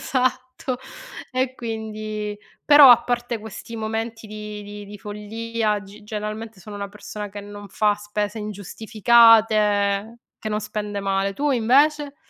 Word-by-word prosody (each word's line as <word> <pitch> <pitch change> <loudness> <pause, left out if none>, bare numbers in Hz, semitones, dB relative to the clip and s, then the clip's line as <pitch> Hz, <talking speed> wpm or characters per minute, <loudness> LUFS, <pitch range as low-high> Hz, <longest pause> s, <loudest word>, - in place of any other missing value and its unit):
Esatto! 255 -1 -1 0.6
E 255 0 0
quindi 215 -2 -5 0.3
però 290 -3 +9
a 240 - +7
parte 240 -1 -2
questi 220 +2 -9
momenti 225 +1 -4
di 210 0 -7
di 205 0 -9
di 205 0 -10
follia, 215 +1 -2
g 205 +2 -14
generalmente 215 0 -6
sono 205 +3 -9
una 200 0 -5
persona 210 0 -7
che 205 +1 -8
non 205 0 -10
fa 210 -1 +2
spese 210 +1 -4
ingiustificate, 215 0 +3 0.2
che 215 - -5
non 210 0 -1
spende 210 -1 -4
male. 195 0 0
Tu 290 +7 0
invece? 280 +4 +3
215 Hz, 135 wpm, -23 LUFS, 205-230 Hz, 0.6 s, però